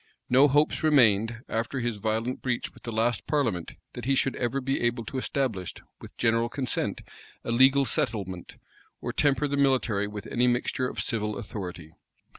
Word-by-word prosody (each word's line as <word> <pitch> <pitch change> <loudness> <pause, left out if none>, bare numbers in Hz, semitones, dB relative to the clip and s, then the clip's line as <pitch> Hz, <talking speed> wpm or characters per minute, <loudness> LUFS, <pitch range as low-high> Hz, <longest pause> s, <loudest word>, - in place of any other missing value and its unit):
No 135 +3 +7
hopes 145 +2 +2
remained, 115 -6 +3
after 115 +4 -2
his 120 -3 -2
violent 110 +4 -2
breach 125 -2 -2
with - - -17
the 115 - -6
last 115 0 0
parliament, 120 - 0 0.2
that - - -7
he 135 +1 +2
should 135 0 +1
ever 120 +2 -1
be 135 +1 -1
able 120 -1 0
to 130 - -3
establish, 125 -10 -2 0.2
with - - -13
general 115 0 +2
consent, 130 -1 -2 0.4
a - - -3
legal 135 +3 +5
settlement, 95 -7 -3 0.4
or - - -4
temper 145 0 +2
the 140 0 -2
military 125 -7 +2
with 105 0 -7
any 125 +2 +1
mixture 125 +1 0
of - - -7
civil 105 -2 -1
authority. 90 -6 -7
120 Hz, 170 wpm, -27 LUFS, 110-135 Hz, 0.4 s, No